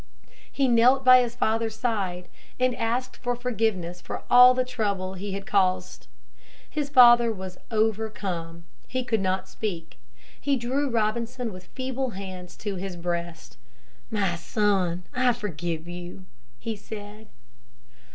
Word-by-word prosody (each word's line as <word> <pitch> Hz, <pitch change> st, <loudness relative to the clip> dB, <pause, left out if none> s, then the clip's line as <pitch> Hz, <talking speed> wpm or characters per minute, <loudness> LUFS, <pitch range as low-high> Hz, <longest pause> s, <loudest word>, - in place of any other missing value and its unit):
He 275 Hz, -1 st, +1 dB
knelt 250 Hz, +3 st, +4 dB
by 255 Hz, 0 st, +9 dB
his 240 Hz, -1 st, -3 dB
father's 225 Hz, -1 st, 0 dB
side 195 Hz, -7 st, -2 dB, 0.3 s
and 255 Hz, 0 st, +3 dB
asked 235 Hz, +2 st, -2 dB
forgiveness 225 Hz, -8 st, -2 dB
for -, -, -6 dB
all 250 Hz, +1 st, +9 dB
the 255 Hz, 0 st, +1 dB
trouble 200 Hz, -7 st, -2 dB
he 195 Hz, +1 st, -5 dB
had 195 Hz, 0 st, -5 dB
caused. 185 Hz, -2 st, 0 dB, 0.6 s
His 295 Hz, -2 st, -3 dB
father 240 Hz, -3 st, +7 dB
was 190 Hz, -3 st, -7 dB
overcome. 205 Hz, -7 st, -2 dB, 0.2 s
He 255 Hz, 0 st, -2 dB
could 225 Hz, -2 st, 0 dB
not 190 Hz, 0 st, -1 dB
speak. 170 Hz, -, -5 dB, 0.4 s
He 280 Hz, -1 st, +2 dB
drew 265 Hz, +3 st, -1 dB
Robinson 230 Hz, +1 st, -1 dB
with 185 Hz, 0 st, -11 dB
feeble 260 Hz, 0 st, -2 dB
hands 185 Hz, -2 st, -8 dB
to 205 Hz, -3 st, -4 dB
his 190 Hz, 0 st, -5 dB
breast. 170 Hz, -3 st, -5 dB, 0.5 s
"My 200 Hz, -6 st, 0 dB
son, 185 Hz, -1 st, 0 dB
I 255 Hz, -1 st, +3 dB
forgive 175 Hz, -7 st, -4 dB
you," 175 Hz, +1 st, -8 dB, 0.3 s
he 225 Hz, -, -4 dB
said. 210 Hz, +1 st, -9 dB
215 Hz, 130 wpm, -26 LUFS, 185-245 Hz, 0.6 s, by